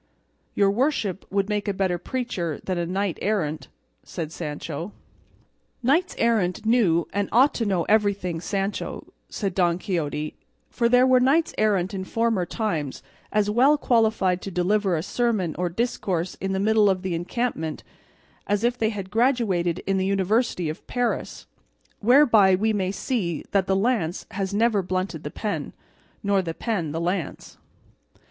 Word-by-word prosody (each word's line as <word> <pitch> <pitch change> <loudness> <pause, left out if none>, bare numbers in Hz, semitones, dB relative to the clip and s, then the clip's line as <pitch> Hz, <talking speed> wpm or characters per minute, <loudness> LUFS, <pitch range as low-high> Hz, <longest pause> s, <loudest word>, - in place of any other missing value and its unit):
"Your 200 -1 +4
worship 215 - -1
would 200 0 0
make 210 -1 -2
a 200 - -1
better 185 -2 0
preacher 180 - -3
than 175 -2 -2
knight 195 -2 -1
errant," 160 -8 -1 0.3
said 160 -2 -6
Sancho. 155 +4 -5 0.9
"Knights 320 +9 +2
errant 215 -5 +1
knew 205 -8 +3
and 200 +1 -1
ought 260 +5 +5
to 230 - -1
know 185 -4 +1
everything, 200 -5 +1
Sancho," 195 +2 -3 0.2
said 195 -4 -3
Don 175 -2 +2
Quixote; 155 -6 -3 0.4
"for 235 -1 +1
there 250 +1 +5
were 255 -1 +5
knights 280 +6 +2
errant 200 -3 +1
in 190 -1 -3
former 225 -3 0
times 165 - -3 0.3
as 210 -1 +2
well 255 +8 +4
qualified 220 -8 +2
to - - -5
deliver 190 +1 +1
a 155 - -2
sermon 215 -7 0
or 180 -1 0
discourse 185 -4 -2
in 195 +1 -1
the 190 - 0
middle 215 0 +4
of 190 -1 -1
an 185 - -1
encampment, 170 -2 -3 0.6
as 205 +1 0
if 245 +1 +1
they 220 - +2
had 195 -4 -6
graduated 215 -8 +1
in 195 0 +1
the 190 0 0
University 195 -1 +1
of 155 - -6
Paris; 245 -4 -2 0.5
whereby 225 -6 +5
we 215 +3 +1
may 190 -2 0
see 195 - -2
that 195 -2 +2
the 190 - +2
lance 195 -5 0
has 195 -2 -3
never 215 0 +2
blunted 185 -3 -3
the 150 - -4
pen, 210 +6 -4 0.5
nor 200 -1 +2
the 165 -3 -5
pen 190 -10 -2
the 160 - -3
lance." 175 -2 -3
195 Hz, 155 wpm, -24 LUFS, 180-225 Hz, 0.9 s, ought